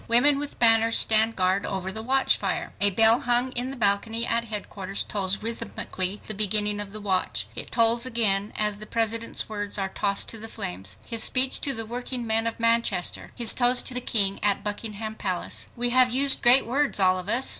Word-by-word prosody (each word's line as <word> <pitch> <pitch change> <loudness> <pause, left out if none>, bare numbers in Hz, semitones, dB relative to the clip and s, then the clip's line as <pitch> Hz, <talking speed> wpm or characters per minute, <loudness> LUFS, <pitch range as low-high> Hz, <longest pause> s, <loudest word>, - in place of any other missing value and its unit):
Women 275 +5 +3
with 290 0 -7
banners 225 -1 +4
stand 220 +1 +2
guard 185 +1 0
over 190 -1 -5
the 220 - -6
watchfire. 265 +3 -1
A 205 - +5
bell 225 +4 +4
hung 245 +1 +3
in 250 +1 -4
the 270 - -7
balcony 225 +2 -1
at 235 0 -2
headquarters 200 -3 -4
tolls 200 -1 -2
rhythmically 205 -3 -6
the 215 - -4
beginning 210 0 +1
of 205 -1 -5
the 215 - -8
watch. 190 -3 -2
It - - -4
tolls 230 0 +5
again 215 -5 0
as 210 -1 -3
the 215 - -7
President's 230 0 -1
words 205 -1 -5
are 195 -1 -2
tossed 200 0 +1
to 225 - -6
the 225 - -7
flames. 95 - -7
His 230 -1 -2
speech 260 0 +3
to 275 - +1
the 225 0 0
workingmen 235 -1 -2
of 230 - -5
Manchester; 230 -5 0
his 235 -3 +4
toast 245 0 +3
to - - -6
the 250 - -2
King 200 -5 +2
at 200 -1 0
Buckingham 215 +1 -6
Palace: 185 -4 -4
"We 245 0 -1
have 255 0 +3
used 270 +2 +2
great 245 +3 +6
words, 275 0 -1
all 185 -1 +3
of 185 +2 -8
us. 245 +4 +3
225 Hz, 200 wpm, -24 LUFS, 200-240 Hz, -, great